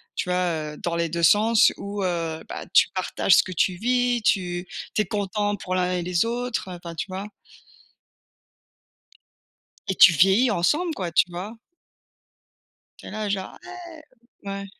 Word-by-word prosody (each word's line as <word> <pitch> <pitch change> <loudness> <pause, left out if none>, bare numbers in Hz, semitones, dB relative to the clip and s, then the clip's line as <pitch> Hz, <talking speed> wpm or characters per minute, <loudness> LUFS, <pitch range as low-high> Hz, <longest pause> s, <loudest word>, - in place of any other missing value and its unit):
tu 180 - -3
vois, 165 -4 -1
heu, - - -12
dans 170 -1 -3
les 170 -1 -1
2 170 +1 -3
sens 215 +6 +5
où, 200 0 -5
heu, 165 -3 -2
bah, - - -6
tu - - +6
partages 185 0 +2
ce - - +5
que 185 - -8
tu 185 +1 +1
vis, 245 +2 0
tu 180 -3 0 0.3
tu 215 - +3
es - - -10
content 205 0 -2
pour 185 -2 -4
l'un 180 0 0
et 180 -1 -1
les 175 +3 0
autres, 240 -4 -3
enfin, 170 -1 -8
tu - - -3
vois? 190 +2 -6 2.6
Et 190 - -1
tu 180 - +8
vieillis 195 - +4
ensemble, 305 - +1
quoi, 175 -3 -4
tu 175 - +3
vois? 190 +6 -7 1.4
Tu - - -12
es - - -8
là, 215 -1 -4
genre: 195 -1 -4
«ouais». 345 -3 -11 0.4
Ouais. 200 0 -5
190 Hz, 165 wpm, -24 LUFS, 175-215 Hz, 2.6 s, tu